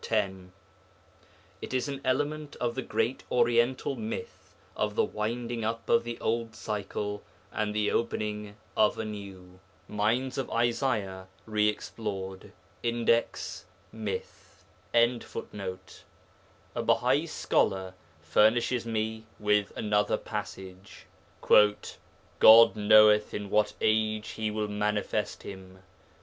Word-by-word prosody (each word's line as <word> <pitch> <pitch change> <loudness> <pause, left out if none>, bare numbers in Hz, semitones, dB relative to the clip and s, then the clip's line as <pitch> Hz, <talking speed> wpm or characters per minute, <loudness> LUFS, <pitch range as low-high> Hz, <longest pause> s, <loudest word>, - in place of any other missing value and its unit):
10); 95 -4 -2 1.1
it - - -5
is 130 +2 0
an 140 -1 -5
element 145 +3 -1
of 120 -1 -1
the 130 - -3
great 130 0 -1
Oriental 120 +2 +2
myth 230 - -6 0.2
of - - -1
the 460 - +3
winding 115 +1 -3
up 115 +1 -3
of 115 - +4
the 120 0 -6
old 115 0 -2
cycle 105 0 -4 0.3
and 105 -1 -1
the 105 -1 +1
opening 105 -2 -2 0.2
of 105 -1 +3
a 110 - -3
new. 95 -3 -9 0.3
[Footnote: - - -33
Cheyne, - - -10
Mines 120 +5 0
of 135 - -3
Isaiah 115 -6 -1 0.2
Re 105 -1 +2
explored, 95 -3 -6 0.3
Index, 115 0 0 0.3
'Myth.'] 105 -4 -7 0.3
A 120 +1 +4 1.6
Bahai - - +2
scholar 95 -1 0 0.3
furnishes 115 +8 +2
me 110 0 -3
with 105 -1 +1
another 105 -1 +1
passage 95 0 -8 0.4
'God 110 +2 +5
knoweth 105 0 +5
in 105 -1 -5
what 105 0 +2
age 110 0 +1
He 110 -1 -3
will 105 0 -2
manifest 105 0 -2
him. 95 -1 -10
110 Hz, 115 wpm, -29 LUFS, 105-115 Hz, 1.6 s, God